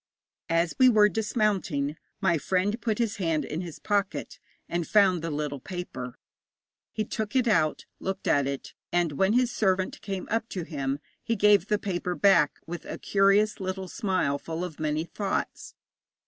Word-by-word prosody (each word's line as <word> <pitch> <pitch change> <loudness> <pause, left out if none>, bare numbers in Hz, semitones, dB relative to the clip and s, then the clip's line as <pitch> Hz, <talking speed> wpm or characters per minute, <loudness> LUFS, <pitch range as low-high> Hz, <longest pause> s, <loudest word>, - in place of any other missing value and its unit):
As 165 0 +2
we 255 -1 +8
were 210 -3 +6
dismounting, 200 -10 0 0.3
my 170 -5 +3
friend 190 - 0
put 220 -3 0
his 230 -2 -1
hand 165 -5 0
in 155 +3 -4
his 170 -4 -7
pocket, 205 -2 -2 0.3
and 170 -2 -2
found 190 -5 +4
the 165 - -3
little 145 -2 -3
paper. 155 -7 -6 0.7
He 215 -1 -2
took 215 +2 -4
it 255 -2 +3
out, 160 -8 +2
looked 190 0 -4
at 140 -1 +3
it, 140 -1 -5 0.2
and 175 -2 +2
when 190 +8 +2
his 245 0 +3
servant 190 -5 0
came 195 -2 -4
up 225 +1 0
to 180 - -4
him 140 -4 -2 0.2
he 230 - -1
gave 205 -2 +4
the 210 - +2
paper 180 -3 -2
back 170 -8 +4
with 170 0 -6
a - - -5
curious 200 +2 +3
little 190 0 -3
smile 185 - 0
full 165 +3 -4
of 175 -4 -6
many 155 0 0
thoughts. 195 +3 -3
185 Hz, 170 wpm, -27 LUFS, 165-210 Hz, 0.7 s, we